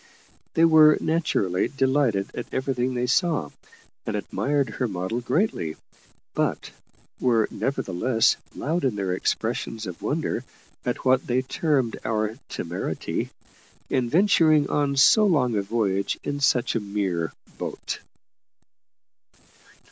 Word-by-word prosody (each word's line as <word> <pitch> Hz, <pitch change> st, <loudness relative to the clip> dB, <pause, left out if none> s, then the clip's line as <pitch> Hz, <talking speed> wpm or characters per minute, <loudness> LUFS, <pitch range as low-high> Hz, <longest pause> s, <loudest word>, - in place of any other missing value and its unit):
They 165 Hz, -, +6 dB
were, 155 Hz, -2 st, +7 dB
naturally, 150 Hz, -, 0 dB
delighted 130 Hz, -7 st, +1 dB
at -, -, -6 dB
everything 130 Hz, -1 st, -1 dB
they 125 Hz, 0 st, 0 dB
saw, 140 Hz, -, +1 dB, 0.5 s
and -, -, -3 dB
admired 140 Hz, -1 st, 0 dB
her 125 Hz, -, -1 dB
model 95 Hz, +4 st, -3 dB
greatly: 120 Hz, -, 0 dB, 0.6 s
but -, -, -1 dB, 0.5 s
were, 115 Hz, -4 st, +3 dB
nevertheless, 115 Hz, -2 st, +1 dB, 0.2 s
loud 165 Hz, +4 st, -1 dB
in 130 Hz, -6 st, +1 dB
their 95 Hz, -3 st, -1 dB
expressions 110 Hz, +4 st, -2 dB
of 90 Hz, -3 st, -7 dB
wonder 150 Hz, -5 st, -1 dB, 0.4 s
at 125 Hz, +1 st, -3 dB
what 130 Hz, 0 st, +3 dB
they 125 Hz, +1 st, +1 dB
termed 135 Hz, -4 st, 0 dB
our 110 Hz, +2 st, -1 dB
temerity 85 Hz, -2 st, -3 dB, 0.6 s
in 125 Hz, -2 st, +1 dB
venturing 160 Hz, -, +4 dB
on 145 Hz, -1 st, +1 dB
so 215 Hz, +11 st, +6 dB
long 140 Hz, -, +2 dB
a 100 Hz, -, +2 dB
voyage 100 Hz, -2 st, -1 dB
in 145 Hz, 0 st, -3 dB
such 130 Hz, -3 st, +2 dB
a -, -, +1 dB
mere 100 Hz, -5 st, -2 dB, 0.3 s
boat. -, -, -4 dB
125 Hz, 120 wpm, -25 LUFS, 105-145 Hz, 0.6 s, were